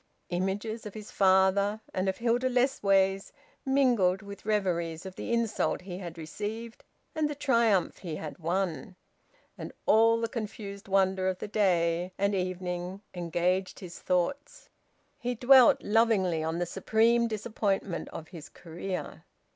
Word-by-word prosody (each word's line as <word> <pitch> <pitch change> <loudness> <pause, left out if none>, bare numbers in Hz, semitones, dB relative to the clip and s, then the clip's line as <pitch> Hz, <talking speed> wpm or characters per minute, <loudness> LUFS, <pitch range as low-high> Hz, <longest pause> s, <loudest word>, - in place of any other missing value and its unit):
Images 200 +5 -2
of 210 - -10
his 215 -1 -9
father 195 +2 +3
and 190 +1 0
of 190 - -3
Hilda 240 +2 +1
Lessways 195 -7 +2 0.4
mingled 235 -9 +3
with 200 0 -10
reveries 175 -5 -1
of 190 -1 -8
the - - -5
insult 230 -2 0
he 180 0 -7
had 170 -3 -8
received 215 +8 -6 0.3
and 310 -1 0
the 295 - -4
triumph 230 - +2
he 170 -5 -5
had 155 +1 -7
won, 175 -1 -2 0.6
and - - -6
all 225 +1 +5
the 230 - -1
confused 210 -3 -6
wonder 190 -1 +2
of 185 -1 0
the - - -6
day 180 -3 +1
and 200 +1 +1
evening 180 0 -3
engaged 180 +2 -1
his 180 -3 -9
thoughts. 185 +11 -2 0.5
He 245 0 -2
dwelt 255 +1 +6
lovingly 205 -7 +2
on 160 +1 -2
the 175 - 0
supreme 225 +6 +2
disappointment 210 -4 -2
of 160 - -9
his 165 -5 -10
career. 175 +2 -6
195 Hz, 140 wpm, -29 LUFS, 180-225 Hz, 0.6 s, dwelt